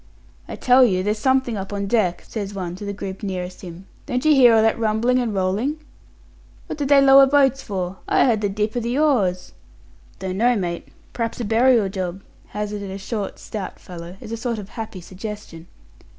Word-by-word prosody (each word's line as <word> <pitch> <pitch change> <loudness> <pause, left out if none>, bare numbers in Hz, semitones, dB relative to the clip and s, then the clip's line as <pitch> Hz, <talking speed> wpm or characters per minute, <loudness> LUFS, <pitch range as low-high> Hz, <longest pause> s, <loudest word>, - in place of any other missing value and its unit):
"I - - -6
tell 255 +1 +5
you 185 -6 +2
there's 210 +2 -1
something 260 -1 +1
up 195 0 -6
on 200 0 -2
deck," 195 -5 0
says 205 -2 -5
one 180 -2 -4
to 205 - -7
the 200 - -3
group 195 -1 -6
nearest 185 -3 -5
him. 180 0 -10 0.2
"Don't 250 +3 -2
you 310 - +6
hear 245 -5 +7
all 220 - +4
that 225 +1 +2
rumbling 230 +3 +2
and 240 -3 -1
rolling?" 205 +10 -1 0.9
"What - - -7
did 285 - -1
they 285 -1 +7
lower 275 0 +7
boats 270 -1 +3
for? 185 -3 -4
I - - +3
heard 225 -5 +2
the 205 - 0
dip 210 +3 -2
o' - - +1
the 240 +3 -2
oars." 210 -13 +1 0.7
"Don't 190 0 -4
know, 240 +3 +3
mate. 175 -4 -3 0.3
P'r'aps 230 0 -3
a 235 - -2
burial 230 0 +4
job," 190 -1 -5 0.2
hazarded 210 -1 -5
a 190 - -5
short, 200 +1 -4
stout 205 -4 -7
fellow, 175 +1 -10
as 215 - -9
a 230 - -3
sort 235 0 -3
of 205 -2 -8
happy 220 -5 -7
suggestion. 185 -3 -9
210 Hz, 200 wpm, -22 LUFS, 190-245 Hz, 0.9 s, hear